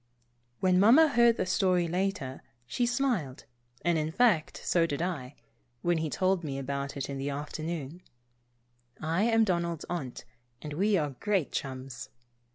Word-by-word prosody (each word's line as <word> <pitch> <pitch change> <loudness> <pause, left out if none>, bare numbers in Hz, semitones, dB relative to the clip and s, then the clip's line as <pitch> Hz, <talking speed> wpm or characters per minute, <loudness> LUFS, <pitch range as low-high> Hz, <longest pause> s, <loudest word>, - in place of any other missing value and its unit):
When 185 -1 +4
Mamma 260 +11 +7
heard 235 -2 +4
the - - 0
story 180 -1 +2
later, 175 -7 -2 0.2
she 240 - 0
smiled, 240 - -1 0.4
and 170 -2 +3
in 155 +1 -2
fact, 195 -7 +2
so 170 -1 +2
did 145 -3 -3
I, 150 -7 -3 0.5
when 175 -1 +2
he 160 -1 -2
told 185 +2 +1
me 140 -3 -4
about 140 +1 -4
it 135 - -3
in 140 -1 -5
the 140 +1 -2
afternoon. 155 +2 -5 1.0
(I 165 +4 0
am 225 -1 +4
Donald's 170 -5 -1
aunt, 140 -8 -5 0.3
and 150 -1 -7
we 200 +5 +2
are 150 -4 -1
great 195 -7 0
chums.) 130 -2 -5
170 Hz, 155 wpm, -29 LUFS, 145-195 Hz, 1.0 s, Mamma